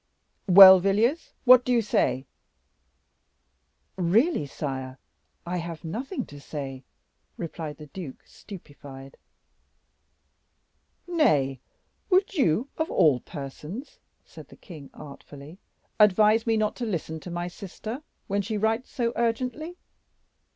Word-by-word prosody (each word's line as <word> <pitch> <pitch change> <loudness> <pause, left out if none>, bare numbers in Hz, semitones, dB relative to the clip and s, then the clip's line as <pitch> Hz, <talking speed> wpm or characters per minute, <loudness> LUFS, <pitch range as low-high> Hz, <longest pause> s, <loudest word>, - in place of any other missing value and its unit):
"Well, 190 0 +10
Villiers, 215 - 0
what 250 0 +8
do 250 - -2
you 235 -2 +3
say?" 135 -9 0 1.7
"Really, 190 - +2
sire, 130 -2 -6 0.5
I 180 +1 -3
have 170 -2 -6
nothing 240 - -5
to 145 - -12
say," 135 -3 -7 0.6
replied 160 -3 -6
the 150 - -11
duke, 150 -1 -9
stupefied. 140 -8 -12 1.9
"Nay, 145 - +1 0.5
would 385 +1 +2
you, 250 - +1
of 320 - -1
all 145 -5 +3
persons," 150 - -9 0.3
said - - -13
the - - -16
king, 155 -7 -12
artfully, 145 +3 -12 0.4
"advise 215 +2 +4
me 225 -1 +2
not 215 -1 0
to 245 - -3
listen 160 -5 -4
to 180 - -10
my 175 0 -4
sister 215 +7 -8 0.2
when 200 0 -1
she 215 +2 -3
writes 220 +4 -1
so 235 -2 -2
urgently?" 255 +9 -2
190 Hz, 115 wpm, -26 LUFS, 150-230 Hz, 1.9 s, Well